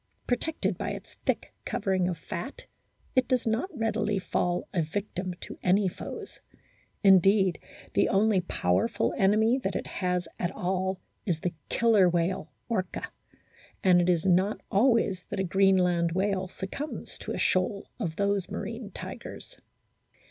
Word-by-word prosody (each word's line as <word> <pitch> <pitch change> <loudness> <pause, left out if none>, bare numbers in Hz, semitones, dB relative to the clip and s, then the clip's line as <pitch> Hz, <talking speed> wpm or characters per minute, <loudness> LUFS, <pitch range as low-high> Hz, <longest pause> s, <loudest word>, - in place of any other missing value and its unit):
Protected 300 +6 -1
by - - -2
its - - -9
thick - - 0
covering 190 -6 0
of 180 -2 -2
fat, 175 - -6 0.5
it 255 -1 +4
does 255 -2 +1
not 225 - 0
readily 220 - 0
fall 180 -1 -1
a 175 - +2
victim 185 +2 -3
to - - -8
any 190 +2 +3
foes; 180 - -7 0.6
indeed, 195 -1 +5 0.3
the - - +3
only 200 -1 +3
powerful 100 - 0
enemy 220 +6 +3
that 195 -7 -2
it - - -2
has 180 -2 -1
at 175 - 0
all 190 +1 -1 0.3
is 165 -4 0
the 180 - -1 0.2
Killer 220 -6 +4
whale, 170 -2 0 0.2
Orca, 190 -6 -2 0.7
and 180 -2 +6
it 175 - +1
is 170 -1 +2
not 190 +3 +3
always 205 -4 +3
that - - -3
a - - +2
Greenland 180 -3 +3
whale 190 0 0
succumbs 195 +11 -6
to - - -4
a - - -3
shoal 190 +2 +1
of 170 -8 -2
those 200 -1 0
marine 225 -1 -5
tigers. - - -8
190 Hz, 145 wpm, -28 LUFS, 180-210 Hz, 0.7 s, and